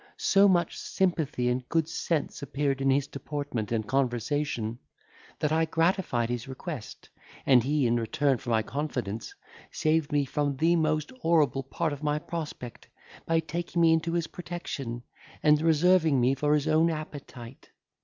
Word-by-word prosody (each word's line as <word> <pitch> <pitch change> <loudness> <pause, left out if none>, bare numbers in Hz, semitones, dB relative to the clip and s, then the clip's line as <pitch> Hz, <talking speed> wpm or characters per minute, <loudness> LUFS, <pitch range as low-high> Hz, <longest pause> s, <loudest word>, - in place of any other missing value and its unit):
So 200 +1 +4
much 175 -3 +1
sympathy 160 -9 0
and 125 0 -1
good 165 -2 +1
sense 165 -2 -2
appeared 140 -1 -1
in 135 - +2
his 135 +1 +3
deportment 140 -6 -5
and 110 -2 -1
conversation, 125 -2 -1 0.6
that 150 - -1
I 160 +1 +3
gratified 165 -7 +1
his 120 +1 -4
request, 130 -1 -7 0.4
and 130 -3 +6
he, 140 +2 +1
in 120 0 +2
return 125 +3 +1
for 120 - -7
my 110 -1 +2
confidence, 120 -6 -4 0.4
saved 155 -1 +1
me 145 -1 +2
from 145 0 -1
the 165 +4 +3
most 155 -2 0
horrible 155 - +2
part 150 +4 -2
of 145 - -8
my 150 -1 0
prospect, 150 -7 -6 0.4
by 165 0 +2
taking 170 +2 -3
me 165 -1 +6
into 165 +1 0
his 170 -2 0
protection, 145 -9 -6 0.4
and 150 0 +5
reserving 165 -2 +4
me 125 +2 +3
for 150 +2 +2
his 150 0 0
own 160 +2 +4
appetite. 140 -6 -8
145 Hz, 155 wpm, -28 LUFS, 130-160 Hz, 0.6 s, and